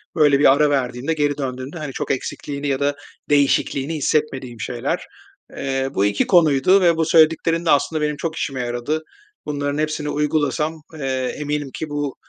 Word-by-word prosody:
böyle 145 Hz, -3 st, +4 dB
bir 145 Hz, -, +7 dB
ara 150 Hz, +1 st, +3 dB
verdiğinde, 130 Hz, +1 st, -1 dB
geri 145 Hz, -2 st, 0 dB
döndüğünde, 130 Hz, +3 st, -5 dB
hani, 150 Hz, -3 st, -5 dB
çok -, -, -3 dB
eksikliğini 140 Hz, +2 st, -4 dB
ya 135 Hz, -1 st, 0 dB
da 145 Hz, 0 st, +1 dB, 0.3 s
değişikliğini 140 Hz, 0 st, +2 dB
hissetmediğim 135 Hz, -5 st, -1 dB
şeyler. 125 Hz, -, -2 dB, 0.6 s
Eee, 135 Hz, -1 st, -1 dB
bu 100 Hz, -, +2 dB
2 100 Hz, 0 st, +1 dB
konuydu 170 Hz, +2 st, +4 dB
ve 170 Hz, -2 st, +4 dB
bu 160 Hz, -, +2 dB
söylediklerin 165 Hz, +1 st, +3 dB
de 165 Hz, -, +3 dB
aslında 155 Hz, +2 st, +2 dB
benim 150 Hz, -1 st, -1 dB
çok 165 Hz, +1 st, -3 dB
işime 135 Hz, -5 st, -3 dB
yaradı. 120 Hz, +6 st, -2 dB, 0.4 s
Bunların 145 Hz, -1 st, -2 dB
hepsini 155 Hz, -1 st, -2 dB
uygulasam, 150 Hz, +1 st, 0 dB, 0.3 s
eee, 130 Hz, -2 st, -2 dB
eminim 145 Hz, -1 st, -2 dB
ki 160 Hz, -, -4 dB
bu 145 Hz, -1 st, -3 dB
145 Hz, 165 wpm, -21 LUFS, 135-155 Hz, 0.6 s, bir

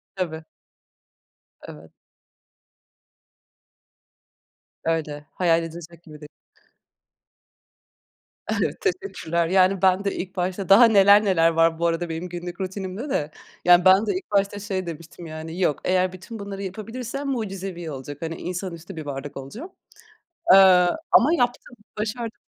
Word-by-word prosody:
Tabii. 160 Hz, -4 st, -4 dB, 1.2 s
Evet. 80 Hz, +1 st, -12 dB, 2.9 s
Öyle. 155 Hz, -3 st, -2 dB
Hayal 170 Hz, -2 st, +2 dB
edilecek 170 Hz, 0 st, -10 dB
gibi 155 Hz, -1 st, -13 dB
de -, -, -9 dB, 2.2 s
Evet, -, -, -2 dB
teşekkürler. 365 Hz, -, -2 dB
Yani, 185 Hz, +1 st, +3 dB
ben 190 Hz, +1 st, +3 dB
de 200 Hz, -, -2 dB
ilk 185 Hz, +1 st, -6 dB
başta, 185 Hz, +1 st, -3 dB
daha 200 Hz, +5 st, +8 dB
neler 205 Hz, -1 st, +6 dB
neler 165 Hz, -4 st, +4 dB
var 165 Hz, 0 st, +2 dB
bu 170 Hz, -, +2 dB
arada 170 Hz, 0 st, -2 dB
benim 165 Hz, +2 st, -5 dB
günlük 175 Hz, +2 st, -7 dB
rutinimde 190 Hz, +7 st, -5 dB
de. 150 Hz, -, -1 dB, 0.3 s
Yani, 175 Hz, 0 st, +6 dB
ben 190 Hz, +3 st, +6 dB
de -, -, 0 dB
ilk 370 Hz, -, -6 dB
başta 200 Hz, 0 st, +1 dB
şey 195 Hz, -2 st, -3 dB
demiştim, 165 Hz, +1 st, -9 dB
yani, 160 Hz, +2 st, -7 dB
"Yok, 155 Hz, -6 st, +1 dB
eğer 185 Hz, 0 st, +2 dB
bütün 200 Hz, +5 st, -9 dB
bunları 200 Hz, -1 st, -6 dB
yapabilirsem 230 Hz, +8 st, -6 dB
mucizevi 195 Hz, -, -4 dB
olacak. 140 Hz, +1 st, -8 dB
Hani, 165 Hz, 0 st, -4 dB
insanüstü 175 Hz, -2 st, -6 dB
bir 155 Hz, -, -7 dB
varlık 140 Hz, 0 st, -6 dB
olacağım." 210 Hz, -, -8 dB, 0.8 s
Eee, -, -, +9 dB, 0.5 s
ama 290 Hz, +7 st, +5 dB
yaptım, 245 Hz, -4 st, -1 dB, 0.2 s
başardım. 230 Hz, +2 st, -4 dB
185 Hz, 130 wpm, -23 LUFS, 165-200 Hz, 2.9 s, Eee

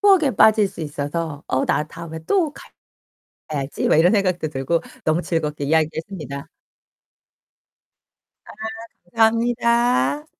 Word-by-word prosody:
추억에 380 Hz, -9 st, +5 dB
빠질 215 Hz, 0 st, +5 dB
수 190 Hz, -2 st, -9 dB
있어서 150 Hz, 0 st, -4 dB
'어 130 Hz, -, 0 dB
나 150 Hz, -, +1 dB
다음에 165 Hz, 0 st, -8 dB
또 335 Hz, -7 st, +2 dB
가 -, -, -13 dB, 0.8 s
가야지.' 140 Hz, -2 st, -2 dB
막 -, -, +4 dB
이런 165 Hz, +3 st, +5 dB
생각도 185 Hz, -6 st, +1 dB
들고 150 Hz, +3 st, -1 dB, 0.2 s
너무 155 Hz, +2 st, +2 dB
즐겁게 150 Hz, -4 st, -2 dB
이야기했습니다. 155 Hz, -1 st, -2 dB, 2.0 s
아 -, -, -9 dB, 0.6 s
감사합니다. 230 Hz, -, +2 dB
165 Hz, 260 characters per minute, -21 LUFS, 150-220 Hz, 2.0 s, 추억에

